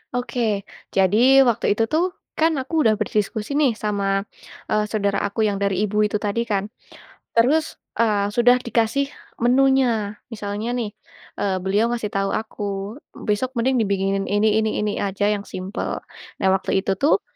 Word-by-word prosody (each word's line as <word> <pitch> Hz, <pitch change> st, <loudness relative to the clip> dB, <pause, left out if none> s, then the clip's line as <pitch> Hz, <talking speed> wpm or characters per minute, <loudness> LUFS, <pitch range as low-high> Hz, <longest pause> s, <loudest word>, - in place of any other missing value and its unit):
Oke, 245 Hz, 0 st, -3 dB, 0.6 s
jadi 235 Hz, +8 st, +5 dB
waktu 230 Hz, -4 st, +2 dB
itu 225 Hz, -, +1 dB
tuh, 355 Hz, +4 st, +1 dB, 0.2 s
kan 320 Hz, +1 st, +4 dB
aku 265 Hz, -, -11 dB
udah 220 Hz, -1 st, +5 dB
berdiskusi 215 Hz, +2 st, -2 dB
nih 285 Hz, -5 st, +4 dB
sama, 200 Hz, -2 st, -1 dB, 0.5 s
eee, 215 Hz, 0 st, +2 dB
saudara 200 Hz, -2 st, 0 dB
aku 215 Hz, +2 st, -1 dB
yang 205 Hz, -2 st, +1 dB
dari 200 Hz, 0 st, +1 dB
Ibu 210 Hz, 0 st, +2 dB
itu 210 Hz, -, -4 dB
tadi 205 Hz, +3 st, 0 dB
kan. 200 Hz, -3 st, 0 dB, 0.7 s
Terus, 290 Hz, +7 st, +3 dB, 0.2 s
eee, 205 Hz, -2 st, +1 dB
sudah 245 Hz, +2 st, +5 dB
dikasih 235 Hz, +2 st, 0 dB, 0.3 s
menunya, 245 Hz, -4 st, +2 dB, 0.2 s
misalnya 210 Hz, +2 st, -3 dB
nih, 235 Hz, -4 st, -2 dB, 0.5 s
eee, 195 Hz, -2 st, 0 dB
beliau 200 Hz, +4 st, +2 dB
ngasih 225 Hz, -3 st, -2 dB
tahu 195 Hz, 0 st, -1 dB
aku, 220 Hz, -1 st, -4 dB, 0.5 s
besok 235 Hz, +5 st, -2 dB
mending 255 Hz, +1 st, +1 dB
dibikinin 195 Hz, 0 st, 0 dB
ini, 210 Hz, +2 st, +2 dB
ini, 220 Hz, 0 st, 0 dB
ini 210 Hz, -, 0 dB
aja 200 Hz, +1 st, 0 dB
yang 205 Hz, -1 st, -1 dB
simpel. 185 Hz, +4 st, -4 dB, 0.4 s
Nah -, -, +3 dB
waktu 190 Hz, 0 st, 0 dB
itu 195 Hz, -1 st, -1 dB
tuh 295 Hz, -, +3 dB
215 Hz, 155 wpm, -22 LUFS, 200-245 Hz, 0.7 s, jadi